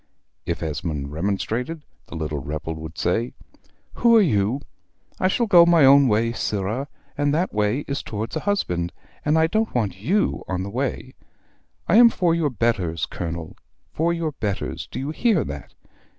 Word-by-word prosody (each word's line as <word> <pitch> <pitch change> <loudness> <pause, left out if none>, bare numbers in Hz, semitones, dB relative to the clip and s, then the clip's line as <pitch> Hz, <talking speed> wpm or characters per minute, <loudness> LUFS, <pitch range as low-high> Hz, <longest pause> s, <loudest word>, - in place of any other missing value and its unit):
If - - -2
Esmond 75 -3 -3
remonstrated, 110 - -2 0.2
the - - -9
little 75 -2 -3
rebel 75 +4 -4
would 80 +1 -9
say 115 +7 0 0.6
"Who 235 -1 +5
are - - +8
you? 115 - +1 0.6
I 185 - +3
shall 235 +5 +1
go 175 -5 +7
my 170 -4 +5
own 140 0 +7
way, 115 +1 +2
sirrah, 110 +4 -2 0.3
and 145 0 +1
that 175 +4 0
way 105 +6 +1
is 140 0 -2
towards 110 +5 -5
a - - 0
husband, 90 - -1 0.3
and 150 +2 +2
I 160 - +5
don't 220 - -1
want 100 -5 -1
YOU 190 - 0
on 95 0 -2
the 100 - -6
way. 130 +1 -3 0.7
I 205 - +5
am 235 0 +9
for 175 -6 +1
your 165 -3 +1
betters, 105 - 0
Colonel, 85 -1 -6 0.4
for 165 +2 +1
your 165 -2 -1
betters: 105 -8 -4
do - - -7
you 135 +3 -3
hear 195 - +2
that? - - -8
120 Hz, 170 wpm, -23 LUFS, -, 0.7 s, am